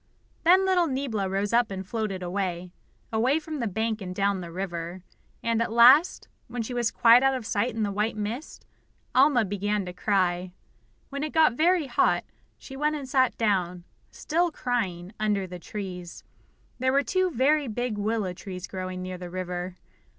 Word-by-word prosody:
Then 370 +3 +5
little 365 -3 +3
Niebla 260 -8 -2
rose 195 +3 -1
up 240 -1 +3
and 190 -1 -5
floated 210 -4 -3
away, 180 -1 -3 0.4
away 250 +7 +2
from 310 -1 -6
the 235 - -1
bank 220 +2 -2
and 180 -1 -6
down 200 -1 +1
the 170 -1 -8
river. 175 -1 -5 0.4
And 230 0 +1
at 230 - -1
last, 250 +9 +6 0.2
when 240 0 -4
she 245 - -6
was 240 -2 +1
quite 235 +2 +6
out 270 0 +3
of 250 -4 -5
sight 220 +3 -1
in 225 - -1
the 205 - -1
white 210 +2 -1
mist, 220 +8 -5 0.5
Alma 260 -3 +5
began 205 +1 -1
to 180 - -6
cry. 180 -2 0 0.6
When 280 0 -5
it 305 0 -3
got 315 -5 +5
very 335 +4 +3
hot, 250 - +2 0.3
she 270 - -11
went 300 +2 0
and 280 -3 -6
sat 260 -1 +2
down, 180 -5 0 0.3
still 345 +3 0
crying, 205 - -3
under 210 -3 0
the 180 -1 -8
trees. 180 -2 -7 0.6
There 260 +1 +2
were 280 +1 +3
two 370 +3 +1
very 290 +1 +2
big 245 0 -2
willow 210 -3 -1
trees 185 0 -7
growing 185 -1 -5
near 185 -1 -6
the 180 -1 -7
river. 180 0 -4
215 Hz, 180 wpm, -26 LUFS, 185-260 Hz, 0.6 s, last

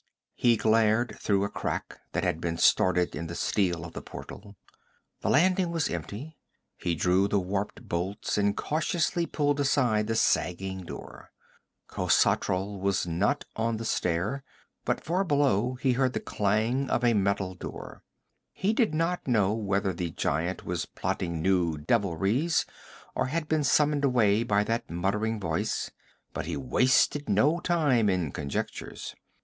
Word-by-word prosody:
He 120 -2 +3
glared 110 +2 +2
through 100 -1 +1
a 100 - -1
crack - - -4
that - - 0
had 80 - -1
been 85 -1 -2
started 90 +1 +3
in 80 +3 -4
the 85 - -6
steel 85 -5 0
of 85 - -9
the - - -6
portal. 100 0 -10 0.6
The - - -2
landing 180 +4 +3
was 165 -2 -1
empty. 105 - -6 0.4
He 85 -2 -2
drew 90 +4 +2
the 100 - +1
warped 100 +5 -4
bolts 95 +4 -2
and 100 0 +1
cautiously 165 +2 0
pulled 145 -1 0
aside 125 -7 +2
the 115 - 0
sagging 95 -2 0
door. - - -10 0.6
Khosatral 95 +2 +1
was 100 -1 0
not 85 +4 0
on 115 0 0
the 115 - -5
stair, 100 +8 -1 0.4
but - - -1
far 180 +4 +1
below 135 - +2
he 130 +1 +1
heard 130 0 +1
the - - -1
clang 110 +6 0
of - - 0
a 120 -1 +4
metal 100 -2 0
door. 90 - -9 0.5
He 200 +3 0
did 220 - +1
not 165 +1 -1
know 105 -5 +3
whether 100 -3 0
the 85 0 -3
giant 80 +4 -2
was 90 -1 -2
plotting 85 -3 -3
new 90 -4 +2
devilries 100 - +1 0.5
or - - 0
had 155 +3 -2
been 155 -1 +1
summoned 145 +1 +3
away 115 -6 +3
by 105 -3 +2
that 115 +2 -2
muttering 105 +6 -1
voice, 85 -5 -2 0.4
but - - -4
he 85 -4 -2
wasted 130 - +2
no 145 - +3
time 145 - +2
in 90 -6 0
conjectures. 70 -1 -5
105 Hz, 155 wpm, -28 LUFS, 90-135 Hz, 0.6 s, a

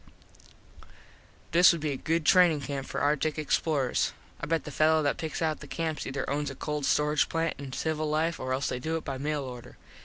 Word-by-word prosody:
This 170 +1 +7
would 170 -2 -3
be 150 -1 -1
a - - -2
good 160 +3 -1
trainin 175 -4 +5
camp 135 -1 -4
for - - -3
artik 150 +1 +1
explorers. 150 -3 0 0.3
I 150 - -5
bet 165 +1 0
the 150 - -7
fello 155 +2 +3
that 145 - +1
picks 160 +1 -3
out 155 -1 0
the - - -10
camps 160 -2 -3
ether 135 -1 -3
owns 145 +1 -1
a 135 - -7
cold 150 -1 -3
storage 150 0 +2
plant 165 -1 0
in 140 -2 -7
civil 155 +2 -2
life 160 +2 0
or 130 0 -4
else 130 +2 0
they 125 - -3
do 160 +5 -2
it 160 - -8
by 135 -2 -4
mail 150 0 -1
order. 125 -2 -9
150 Hz, 215 wpm, -28 LUFS, 140-160 Hz, 0.3 s, This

